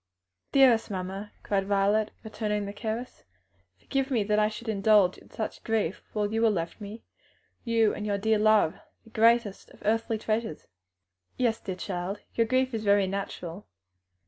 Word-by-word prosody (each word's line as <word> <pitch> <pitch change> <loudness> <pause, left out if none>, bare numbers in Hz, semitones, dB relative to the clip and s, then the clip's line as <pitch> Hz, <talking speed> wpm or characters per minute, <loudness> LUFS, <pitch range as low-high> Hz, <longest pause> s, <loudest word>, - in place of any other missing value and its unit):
"Dearest 250 -5 +5
mamma!" 195 +1 -5
cried 195 -1 0
Violet, 205 +2 +2
returning 210 -2 -2
the 200 - -6
caress, 225 +3 -5 0.5
"forgive 270 0 -2
me 235 -6 +1
that 210 +1 +1
I 210 0 +3
should 220 +2 -9
indulge 205 -3 +3
in - - -19
such 220 - -5
grief 215 -6 -1
while 210 0 -1
you 225 +1 +1
are 225 - +6
left 170 0 -3
me 210 +3 -8 0.6
you 230 -3 +2
and 210 - -5
your 205 -1 0
dear 220 +1 +2
love, 215 -6 +3 0.2
the 225 - -19
greatest 225 -2 +2
of - - -17
earthly 225 +1 +1
treasures." 215 -5 -2 0.7
"Yes, 235 -3 +1
dear 190 - -5
child, 185 +1 -4
your 230 -1 +2
grief 255 +1 +1
is 220 -1 -2
very 200 -1 +4
natural. 190 -1 -5
215 Hz, 165 wpm, -28 LUFS, 200-225 Hz, 0.7 s, are